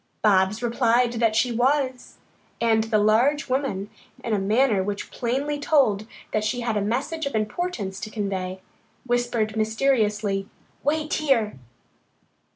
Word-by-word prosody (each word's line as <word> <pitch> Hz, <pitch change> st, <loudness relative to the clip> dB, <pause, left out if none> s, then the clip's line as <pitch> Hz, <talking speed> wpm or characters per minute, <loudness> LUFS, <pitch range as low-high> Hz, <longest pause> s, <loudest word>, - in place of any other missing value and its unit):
Bobs 200 Hz, +2 st, +3 dB
replied 240 Hz, 0 st, +2 dB
that 230 Hz, -2 st, +1 dB
she 245 Hz, +2 st, +2 dB
was, 255 Hz, +2 st, 0 dB, 0.4 s
and 225 Hz, -1 st, +2 dB
the 225 Hz, -1 st, +1 dB
large 235 Hz, +8 st, +3 dB
woman, 255 Hz, -7 st, -1 dB, 0.4 s
in 230 Hz, -, -2 dB
a 205 Hz, -, +2 dB
manner 215 Hz, +1 st, +2 dB
which 200 Hz, +1 st, -4 dB
plainly 275 Hz, +5 st, -2 dB
told 240 Hz, -9 st, +2 dB, 0.3 s
that 215 Hz, -, +1 dB
she 215 Hz, +3 st, -1 dB
had 230 Hz, -2 st, -1 dB
a 205 Hz, -, +1 dB
message 275 Hz, +9 st, -2 dB
of 280 Hz, -, -4 dB
importance 215 Hz, -, -2 dB
to 215 Hz, -, -6 dB
convey, 190 Hz, -3 st, -3 dB, 0.4 s
whispered 240 Hz, -3 st, 0 dB
mysteriously, 215 Hz, -3 st, +1 dB, 0.3 s
"Wait 305 Hz, +2 st, 0 dB
here!" 235 Hz, -, +1 dB
225 Hz, 135 wpm, -24 LUFS, 210-260 Hz, 0.4 s, Bobs